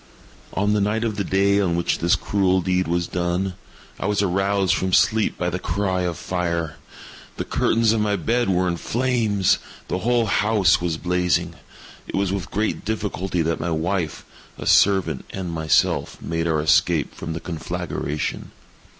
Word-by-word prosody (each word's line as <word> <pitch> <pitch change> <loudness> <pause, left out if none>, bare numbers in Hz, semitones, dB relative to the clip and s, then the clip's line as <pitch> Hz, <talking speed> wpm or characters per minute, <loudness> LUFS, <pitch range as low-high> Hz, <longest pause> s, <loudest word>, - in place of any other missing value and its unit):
On 105 +2 +1
the 105 - +2
night 105 +3 0
of 110 -3 -1
the 100 - -1
day 100 +1 +2
on 90 -4 +1
which 85 - 0
this 85 +1 +3
cruel 95 -2 +1
deed 90 0 0
was 85 +1 0
done, 90 +2 -1 0.5
I - - -2
was 105 -1 +1
aroused 95 0 +1
from 95 -1 -1
sleep 110 +3 +3
by 90 0 -1
the 90 - -3
cry 95 -1 -1
of 90 -2 -2
fire. 85 -3 -2 0.6
The - - -3
curtains 115 -1 +2
of 110 -1 +1
my 105 -1 +1
bed 115 +5 0
were 90 0 +2
in 85 -1 -1
flames. 115 -4 +1 0.3
The 90 - -1
whole 120 +2 +2
house 105 -4 +3
was 85 -2 -1
blazing. 90 -1 0 0.5
It - - -5
was 100 -1 0
with 100 -2 -4
great 105 +2 -1
difficulty 95 -5 -2
that 80 +1 -1
my 85 - -2
wife, 85 0 -2 0.3
a - - -7
servant, 95 -2 +3
and 95 -3 -5
myself, 80 -1 +1
made 80 0 -2
our 80 -2 +1
escape 75 - +2
from 80 - -6
the 80 - -4
conflagration. 80 -3 -4
95 Hz, 170 wpm, -22 LUFS, 85-100 Hz, 0.6 s, this